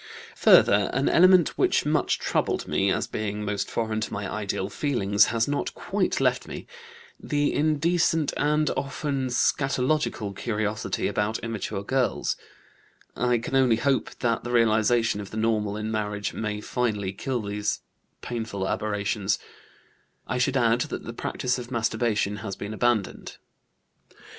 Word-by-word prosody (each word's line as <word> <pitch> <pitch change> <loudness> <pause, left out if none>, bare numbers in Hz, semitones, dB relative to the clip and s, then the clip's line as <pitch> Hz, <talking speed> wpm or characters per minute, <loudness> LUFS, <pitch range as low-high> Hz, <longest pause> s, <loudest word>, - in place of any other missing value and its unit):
Further, - - +6
an - - +1
element 185 -1 +5
which - - +3
much - - +1
troubled - - -1
me, 100 0 +1
as - - 0
being 105 0 -4
most 100 -1 -2
foreign 110 -1 -2
to - - -3
my 100 -1 -3
ideal 100 -2 -3
feelings, 105 -4 +2
has 115 0 0
not 145 0 -1
quite - - -1
left - - +1
me - - -7 0.5
the 145 0 0
indecent 160 0 +2
and 150 +1 +1
often 140 -1 -2
scatologic 130 -4 0
curiosity 110 0 -2
about 105 +2 -1
immature 110 -3 -3
girls. 130 +3 0 0.8
I 125 -1 +2
can 115 +3 -4
only 130 -3 +4
hope 130 +2 0
that 115 -2 0
the 120 - -5
realization 115 -2 +2
of 100 - -8
the 110 - -7
normal 105 -2 0
in 110 +1 -3
marriage 105 -1 -2
may 105 -1 -3
finally 105 -6 -1
kill 130 +5 -2
these 105 +1 -2 0.4
painful 110 -5 -3
aberrations. 105 -1 -1 0.9
I - - -2
should 135 +2 +2
add 120 -1 +3
that - - -5
the - - -7
practice 125 0 -2
of 120 -1 -8
masturbation 110 -3 0
has 100 -3 -5
been 105 +1 -6
abandoned." 115 -3 -1
115 Hz, 145 wpm, -26 LUFS, 105-130 Hz, 0.9 s, Further